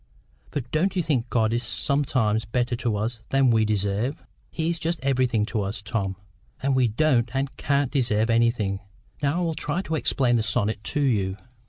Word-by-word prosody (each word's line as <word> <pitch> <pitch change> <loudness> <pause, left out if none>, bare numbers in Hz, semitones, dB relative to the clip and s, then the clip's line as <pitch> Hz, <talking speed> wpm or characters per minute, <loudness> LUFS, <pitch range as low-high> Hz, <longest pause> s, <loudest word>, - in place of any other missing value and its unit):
But 130 -4 -5
don't 185 +6 +1
you 180 - +1
think 130 -6 0
God 110 -1 +2
is 120 - +1
sometimes 120 -3 +1
better 120 +2 -1
to 115 -3 -1
us 110 +2 -3
than 135 -2 +4
we 110 -1 +3
deserve?" 105 +5 -1 0.3
"He 160 -1 -2
is 170 0 -1
just 165 +1 -1
everything 130 -5 +2
to 110 -1 -2
us, 100 0 -3
Tom; 100 -3 -2 0.4
and 135 0 +1
we 130 -2 +4
don't 120 0 +2
and 135 0 -1
can't 140 -2 0
deserve 115 -5 +1
anything. 115 -4 +2 0.4
Now 145 +3 +1
I - - 0
will 165 -2 0
try 160 +4 -2
to 160 - -4
explain 130 -5 +2
the - - +1
sonnet 110 0 0
to 145 - -1
you." 100 -8 +1
120 Hz, 190 wpm, -25 LUFS, 110-140 Hz, 0.4 s, than